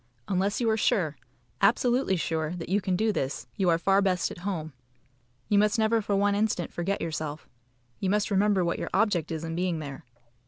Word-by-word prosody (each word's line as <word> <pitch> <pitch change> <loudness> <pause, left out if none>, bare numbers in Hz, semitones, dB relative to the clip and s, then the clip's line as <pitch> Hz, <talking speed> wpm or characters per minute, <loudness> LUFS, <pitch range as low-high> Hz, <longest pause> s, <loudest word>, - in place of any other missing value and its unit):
Unless 195 +1 0
you 240 - 0
are 220 - +1
sure 170 -8 +1 0.5
absolutely 245 -1 +3
sure 160 -1 -2
that 170 -1 -7
you 200 +2 +2
can 185 0 0
do 220 +4 +2
this, 135 -8 -3
you 190 -4 +1
are 165 - +4
far 195 +3 +3
best 185 -3 +1
at - - -9
home. 170 -5 -4 0.7
You 205 - +4
must 210 +2 +3
never 220 +1 +2
for 205 -1 -1
one 200 +1 +2
instant 205 -4 0
forget 195 +4 -2
yourself. 155 -1 -4 0.5
You 190 - -1
must 210 +2 +1
remember 200 -2 +3
what 170 - -1
your - - -3
object 190 -6 +1
is 160 0 -3
in 165 0 -4
being 175 -1 0
there. 140 -3 -7
190 Hz, 200 wpm, -27 LUFS, 165-205 Hz, 0.7 s, are